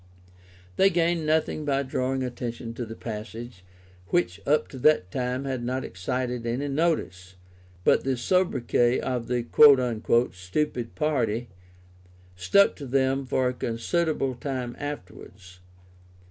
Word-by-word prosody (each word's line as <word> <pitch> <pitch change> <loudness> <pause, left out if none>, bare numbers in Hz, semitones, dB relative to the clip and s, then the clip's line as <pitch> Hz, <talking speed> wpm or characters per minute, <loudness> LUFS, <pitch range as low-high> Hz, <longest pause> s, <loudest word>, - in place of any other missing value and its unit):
They 195 - +6
gained 170 -2 +1
nothing 155 0 +1
by 140 -1 0
drawing 130 0 -1
attention 120 -2 -5
to 115 0 -5
the 110 - -7
passage, 110 -2 -7 0.4
which 90 0 0
up 150 +2 +3
to 130 - -9
that 125 -11 +3
time 125 +2 -2
had 130 -3 -3
not 130 +2 -2
excited 125 +5 -3
any 130 +5 -2
notice, 135 - -1 0.5
but - - +4
the 135 -1 0
sobriquet 125 -5 +2
of 125 -3 -3
"the 120 -1 -1 0.9
stupid 115 +6 -3
party" 125 -7 0 0.9
stuck 95 - +4
to 140 - -7
them 135 +1 +1
for 130 0 +1
a - - -3
considerable 135 +4 -1
time 125 -1 -4
afterwards. 95 -8 -8
125 Hz, 125 wpm, -26 LUFS, 115-140 Hz, 0.9 s, They